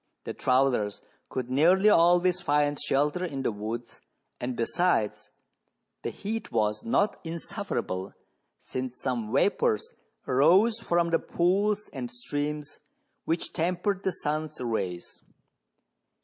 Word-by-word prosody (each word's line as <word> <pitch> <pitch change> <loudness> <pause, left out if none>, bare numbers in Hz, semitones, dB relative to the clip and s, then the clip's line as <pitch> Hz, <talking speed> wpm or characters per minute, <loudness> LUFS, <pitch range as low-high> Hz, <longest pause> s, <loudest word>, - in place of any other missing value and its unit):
The - - -5
travellers 125 -6 +1 0.3
could 125 -1 -4
nearly 175 +9 +5
always 175 0 +4
find 145 -2 +2
shelter 150 +6 +1
in 140 -7 -3
the - - +1
woods, 110 +3 -6 0.4
and, 125 0 -3
besides, 120 -2 0 0.7
the - - -2
heat 220 +1 -5
was 105 -1 +1
ncft 200 - +1
insufferable, 165 - -4 0.4
since 130 -1 -5
some 115 -4 -2
vapours 455 - +1 0.3
arose 185 - +4
from 170 -5 +1
the 165 - +3
pools 200 +4 +1
and 125 -4 -4
streams 145 +4 -4 0.5
which 165 +1 -1
tempered 180 +4 0
the 190 - 0
sun's 155 -2 -3
rays. 95 -8 -3
150 Hz, 115 wpm, -28 LUFS, 125-180 Hz, 0.7 s, nearly